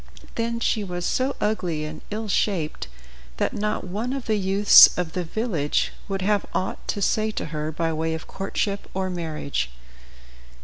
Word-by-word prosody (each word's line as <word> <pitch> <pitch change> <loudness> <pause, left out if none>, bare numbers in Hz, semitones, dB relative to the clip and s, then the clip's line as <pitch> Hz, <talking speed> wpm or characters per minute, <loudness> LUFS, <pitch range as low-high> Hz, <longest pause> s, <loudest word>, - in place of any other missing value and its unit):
Then 230 0 -1
she 225 -2 +1
was 175 -2 -4
so 260 +2 0
ugly 175 -8 -1
and 155 0 -7
ill 215 +1 -4
shaped 180 - 0 0.5
that - - 0
not 210 +1 -1
one 215 +8 -3
of 275 -3 -4
the 220 - +1
youths 195 +2 +8
of 175 -2 -2
the 180 - -1
village 170 -5 -1 0.2
would 195 -1 -2
have 205 0 +2
aught 185 - -2
to 200 - -1
say 215 +2 +2
to 215 - -3
her 155 0 -2
by 165 +1 -1
way 160 +1 -1
of 160 - -7
courtship 200 +1 -3
or 190 -1 -1
marriage. 155 - -3
190 Hz, 170 wpm, -24 LUFS, 160-215 Hz, 0.5 s, youths